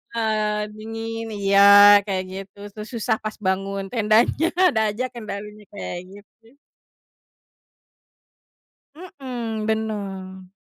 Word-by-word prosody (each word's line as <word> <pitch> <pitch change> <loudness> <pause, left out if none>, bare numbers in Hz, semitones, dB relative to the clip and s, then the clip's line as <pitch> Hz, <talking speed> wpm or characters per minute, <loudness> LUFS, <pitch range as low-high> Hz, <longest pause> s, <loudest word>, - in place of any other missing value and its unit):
Eee, 215 -2 -1
dingin 225 +1 -6
iya 200 0 +2 0.5
kayak 190 -1 -1
gitu, 195 +1 -9
terus 210 +1 -9
susah 220 0 0
pas 215 - -4
bangun 195 +1 -1
tendanya, 230 +7 +2 0.2
ada 220 - 0
aja 250 +5 -3
kendalanya 210 -2 -8
kayak 185 -3 -6
gitu. 225 +5 -18 2.4
Mhm, 250 -10 -6
benar. 195 -4 -4
215 Hz, 95 wpm, -22 LUFS, 200-225 Hz, 2.4 s, iya